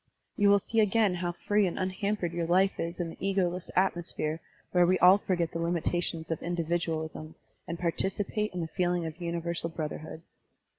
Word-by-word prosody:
You 205 Hz, -1 st, +4 dB
will 200 Hz, -, +7 dB
see 225 Hz, +3 st, -1 dB
again 215 Hz, -2 st, +3 dB
how 175 Hz, -1 st, -2 dB
free 205 Hz, +3 st, +1 dB
and 175 Hz, -, -4 dB
unhampered 190 Hz, -1 st, -1 dB
your 170 Hz, -1 st, -1 dB
life 190 Hz, +3 st, +3 dB
is 170 Hz, +2 st, -3 dB
in 170 Hz, -1 st, -2 dB
the -, -, -12 dB
ego 195 Hz, -1 st, +1 dB
less 180 Hz, +1 st, -6 dB
atmosphere 175 Hz, -4 st, 0 dB, 0.3 s
where 175 Hz, -1 st, +4 dB
we 185 Hz, +1 st, +4 dB
all 185 Hz, +3 st, +7 dB
forget 175 Hz, -4 st, -1 dB
the 165 Hz, -, -4 dB
limitations 170 Hz, -1 st, -1 dB
of 165 Hz, -, -2 dB
individualism 165 Hz, -2 st, -2 dB, 0.3 s
and 170 Hz, 0 st, -4 dB
participate 195 Hz, +5 st, -1 dB
in 180 Hz, -, -4 dB
the 165 Hz, -, -2 dB
feeling 175 Hz, 0 st, 0 dB
of 160 Hz, +2 st, -7 dB
universal 170 Hz, 0 st, -2 dB
brotherhood." 160 Hz, 0 st, -6 dB
175 Hz, 180 wpm, -29 LUFS, 165-190 Hz, 0.3 s, will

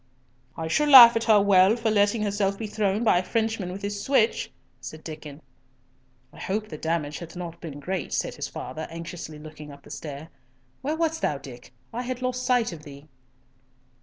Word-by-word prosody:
"I 160 Hz, -, -3 dB
shall 295 Hz, -, +1 dB
laugh 240 Hz, -4 st, +11 dB
at 230 Hz, -, 0 dB
her 215 Hz, -2 st, +6 dB
well 200 Hz, +1 st, +5 dB
for 230 Hz, -2 st, -1 dB
letting 210 Hz, +1 st, +2 dB
herself 200 Hz, -1 st, 0 dB
be 225 Hz, -, -5 dB
thrown 210 Hz, 0 st, -1 dB
by 200 Hz, -6 st, +4 dB
a -, -, -3 dB
Frenchman 220 Hz, -3 st, -1 dB
with 195 Hz, +2 st, -8 dB
his 200 Hz, 0 st, -3 dB
switch," 250 Hz, -5 st, +2 dB, 0.3 s
said 155 Hz, 0 st, -9 dB
Diccon. 155 Hz, -2 st, -9 dB, 0.9 s
"I -, -, -14 dB
hope 210 Hz, +2 st, -3 dB
the 155 Hz, -, -7 dB
damage 160 Hz, -3 st, -2 dB
hath 170 Hz, 0 st, -10 dB
not 170 Hz, -1 st, -7 dB
been 150 Hz, -4 st, -7 dB
great," 180 Hz, +2 st, -4 dB
said -, -, -1 dB
his -, -, -5 dB
father, 155 Hz, 0 st, -7 dB
anxiously 165 Hz, -2 st, -8 dB
looking 150 Hz, -1 st, -11 dB
up 140 Hz, -, -14 dB
the -, -, -14 dB
stair. 150 Hz, +1 st, -7 dB, 0.5 s
"Where 300 Hz, +4 st, -2 dB
wast 325 Hz, 0 st, -1 dB
thou, 145 Hz, -, 0 dB
Dick? 125 Hz, -3 st, -12 dB, 0.2 s
I 240 Hz, -, -3 dB
had 250 Hz, 0 st, -5 dB
lost 255 Hz, 0 st, -2 dB
sight 245 Hz, -4 st, +2 dB
of 160 Hz, -, -10 dB
thee." 145 Hz, 0 st, -13 dB
190 Hz, 195 wpm, -25 LUFS, 155-225 Hz, 0.9 s, laugh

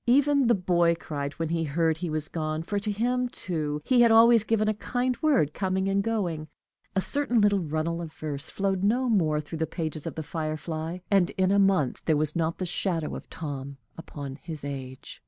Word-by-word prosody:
Even 280 Hz, +1 st, +4 dB
the 235 Hz, -, +5 dB
boy 175 Hz, -3 st, +2 dB
cried 145 Hz, -3 st, -5 dB
when 165 Hz, -1 st, -3 dB
he 165 Hz, 0 st, 0 dB
heard 160 Hz, +1 st, +1 dB
he 175 Hz, 0 st, -3 dB
was 155 Hz, -1 st, -1 dB
gone, 155 Hz, -1 st, -3 dB
for 205 Hz, +4 st, -2 dB
to 210 Hz, +1 st, -2 dB
him 245 Hz, +4 st, 0 dB
too 150 Hz, -8 st, -3 dB
he 250 Hz, -2 st, +4 dB
had 235 Hz, -, +7 dB
always 225 Hz, 0 st, +7 dB
given 215 Hz, -1 st, +1 dB
a 215 Hz, -, +2 dB
kind 245 Hz, +4 st, -1 dB
word, 260 Hz, -, +3 dB
coming 190 Hz, 0 st, -1 dB
and 195 Hz, 0 st, +2 dB
going. 185 Hz, -8 st, -2 dB, 0.5 s
A 190 Hz, -, +3 dB
certain 265 Hz, 0 st, 0 dB
little 205 Hz, -1 st, +4 dB
runnel 165 Hz, +1 st, -2 dB
of 165 Hz, -2 st, -6 dB
verse 145 Hz, -3 st, -5 dB
flowed 195 Hz, -1 st, -1 dB
no 245 Hz, +5 st, +2 dB
more 165 Hz, -10 st, +2 dB
through 150 Hz, +2 st, -6 dB
the 160 Hz, -, 0 dB
pages 160 Hz, -2 st, -4 dB
of 160 Hz, -, -5 dB
"The 160 Hz, -, -4 dB
Firefly," 160 Hz, +1 st, -4 dB
and 195 Hz, -3 st, +4 dB
in 190 Hz, 0 st, +3 dB
a 200 Hz, -, +4 dB
month 195 Hz, -9 st, +2 dB
there 155 Hz, -2 st, +3 dB
was 155 Hz, 0 st, -1 dB
not 165 Hz, -1 st, 0 dB
the 185 Hz, -, -2 dB
shadow 170 Hz, -2 st, -1 dB
of -, -, -9 dB
Tom 140 Hz, -3 st, -6 dB, 0.2 s
upon 145 Hz, -5 st, -7 dB
his 155 Hz, 0 st, -8 dB
age. 130 Hz, -2 st, -7 dB
170 Hz, 210 wpm, -27 LUFS, 155-205 Hz, 0.5 s, had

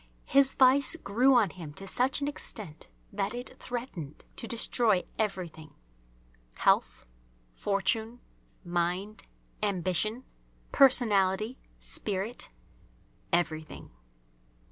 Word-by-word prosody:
His 275 Hz, -1 st, +4 dB
vice 265 Hz, +4 st, +5 dB
grew 255 Hz, 0 st, +3 dB
on 215 Hz, -8 st, +4 dB
him 160 Hz, -5 st, -9 dB
to 195 Hz, -, -6 dB
such 255 Hz, +8 st, +1 dB
an 285 Hz, -, 0 dB
extent 210 Hz, -, -5 dB, 0.2 s
that 200 Hz, +2 st, -1 dB
it 245 Hz, +1 st, -1 dB
threatened 230 Hz, -, -6 dB
to 230 Hz, -, -6 dB
destroy 230 Hz, -4 st, +2 dB, 0.2 s
everything, 180 Hz, -7 st, -3 dB, 0.8 s
health, -, -, +2 dB, 0.5 s
fortune, 215 Hz, -, -1 dB, 0.5 s
mind, 175 Hz, +5 st, -1 dB, 0.4 s
ambition, 205 Hz, +4 st, 0 dB, 0.5 s
personality, 220 Hz, -4 st, +4 dB, 0.2 s
spirit, 205 Hz, +4 st, -3 dB, 0.8 s
everything. 160 Hz, -3 st, -1 dB
205 Hz, 90 wpm, -29 LUFS, 180-245 Hz, 0.8 s, vice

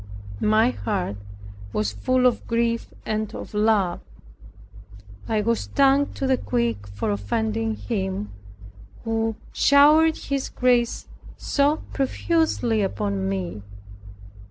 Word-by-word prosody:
My 220 Hz, +3 st, +4 dB
heart 190 Hz, -, -3 dB, 0.6 s
was 105 Hz, -1 st, 0 dB
full 255 Hz, -, +1 dB
of 250 Hz, -, +1 dB
grief 230 Hz, 0 st, 0 dB, 0.2 s
and 215 Hz, -1 st, -2 dB
of -, -, -8 dB
love. 210 Hz, -4 st, +2 dB, 1.3 s
I 215 Hz, -1 st, +1 dB
was 230 Hz, +2 st, +1 dB
stung 275 Hz, +1 st, +2 dB
to 275 Hz, -, -3 dB
the 260 Hz, -1 st, +2 dB
quick 115 Hz, -4 st, -1 dB
for 100 Hz, +1 st, -3 dB
offending 110 Hz, +2 st, -1 dB
Him, 100 Hz, 0 st, -3 dB, 0.7 s
who 225 Hz, 0 st, -1 dB, 0.2 s
showered 305 Hz, +3 st, +5 dB
His 275 Hz, -2 st, -3 dB
grace 245 Hz, -2 st, +1 dB, 0.3 s
so 290 Hz, +2 st, +1 dB
profusely 270 Hz, -5 st, +1 dB
upon 195 Hz, -1 st, -1 dB
me. 185 Hz, -, -4 dB
220 Hz, 110 wpm, -24 LUFS, -, 1.3 s, showered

